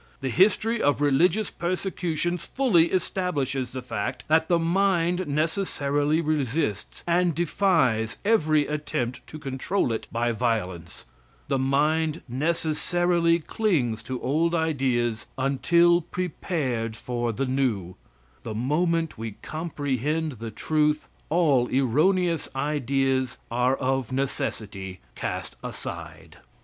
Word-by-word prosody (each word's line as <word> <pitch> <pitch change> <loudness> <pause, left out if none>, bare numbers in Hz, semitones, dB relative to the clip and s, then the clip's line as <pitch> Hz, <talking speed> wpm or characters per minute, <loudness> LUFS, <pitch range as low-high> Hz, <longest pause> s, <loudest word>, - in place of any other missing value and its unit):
The 135 - -2
history 215 - +3
of 145 0 +2
religious 165 +9 +3
persecutions 175 -1 -2
fully 210 -12 +3
establishes 150 -8 -1
the 130 -1 -6
fact 115 -5 -3
that 160 +1 +4
the 175 - +3
mind 180 0 +1
necessarily 150 -1 0
resists 145 - -1
and 175 -1 +2
defies 155 - +2
every 155 -9 +3
attempt 130 -5 -3
to 155 - -8
control 135 +2 -1
it 110 - -4
by 120 +1 0
violence. 105 -8 -2 0.4
The 135 -2 +1
mind 150 +4 +1
necessarily 170 +4 +1
clings 155 - 0
to 130 -1 -4
old 165 +5 +1
ideas 130 -8 0
until 170 +6 +4
prepared 150 - -2
for 120 -1 -2
the 135 +5 -2
new. 125 -9 0 0.5
The 110 - -5
moment 160 +5 0
we 110 -2 -4
comprehend 155 -1 -2
the 115 0 -5
truth, 150 +6 0 0.2
all 150 -7 +3
erroneous 160 +7 +2
ideas 135 -2 0
are 125 +2 +2
of 130 -2 -1
necessity 100 -8 -3
cast - - -4
aside. 80 -1 -7
145 Hz, 110 wpm, -26 LUFS, 125-170 Hz, 0.5 s, that